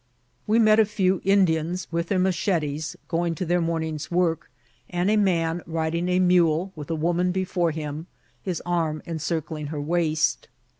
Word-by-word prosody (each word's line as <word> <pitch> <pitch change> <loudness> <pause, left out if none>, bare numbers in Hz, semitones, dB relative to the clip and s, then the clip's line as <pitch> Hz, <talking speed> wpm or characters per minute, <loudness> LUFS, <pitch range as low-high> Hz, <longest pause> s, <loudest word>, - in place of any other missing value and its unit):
We 215 +2 +3
met 215 -1 +5
a 220 - +6
few 190 -3 0
Indians, 180 -3 +2
vnth 170 +1 -1
their 195 - 0
machetes, 165 -5 0
going 170 0 -1
to 180 - -3
their 175 +1 +1
morn 165 -1 -1
ing's 155 -1 -5
work, 170 -2 0 0.4
and 180 +3 0
a - - +3
man 175 -5 +1
riding 165 +2 -1
a 180 - +2
mule, 180 0 +3
with 150 -1 -8
a 165 - 0
woman 175 +3 +1
before 180 -2 0
him, 155 +1 -5 0.3
his 180 +1 -4
arm 165 -3 -1
encircling 160 -2 -3
her 150 0 -4
waist. 160 0 0
170 Hz, 165 wpm, -25 LUFS, 160-180 Hz, 0.4 s, a